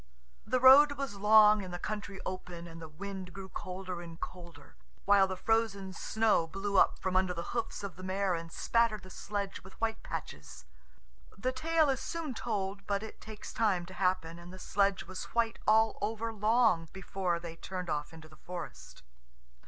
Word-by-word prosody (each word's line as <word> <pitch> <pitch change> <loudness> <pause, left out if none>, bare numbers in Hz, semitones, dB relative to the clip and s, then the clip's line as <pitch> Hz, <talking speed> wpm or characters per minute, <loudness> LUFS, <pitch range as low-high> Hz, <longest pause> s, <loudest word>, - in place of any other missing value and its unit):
The 255 +3 +2
road 275 +3 +9
was 275 -7 -4
long 210 0 +7
and 185 - -7
the 175 - -4
country 205 0 -5
open, 180 -2 -5
and 165 -1 -10
the 160 - -8
wind 190 +2 -7
grew 190 0 -8
colder 185 -1 -5
and 165 -1 -10
colder, 170 -5 -9 0.3
while 200 -1 +6
the 185 -1 -4
frozen 215 -4 0
snow 215 -3 +2
blew 195 +4 -3
up - - +5
from 185 -1 -2
under 185 -1 +2
the 170 0 -5
hoofs 230 -3 -3
of 195 -2 -6
the - - -9
mare 190 0 0
and 165 -1 -5
spattered 230 -1 +1
the 185 - -12
sledge 200 0 -4
with 190 - -15
white 225 -1 -1
patches. 65 -4 -7 0.7
The 255 +6 0
tale 315 +4 +2
is 270 -2 +1
soon 330 -5 -4
told, 195 -4 -3
but 200 0 0
it 220 - -9
takes 215 -1 -9
time 200 -6 +1
to 185 - -11
happen, 180 -3 0
and 175 +1 -11
the 185 - -9
sledge 195 +1 +1
was 185 +1 -6
white 230 -1 +1
all 220 +1 +4
over 225 +2 -2
long 215 -6 +3
before 190 -2 -2
they 170 -1 -7
turned 180 +1 -5
off 150 -2 -2
into 160 -1 -12
the 155 0 -17
forest. 175 +1 -8
195 Hz, 185 wpm, -32 LUFS, 175-220 Hz, 0.7 s, road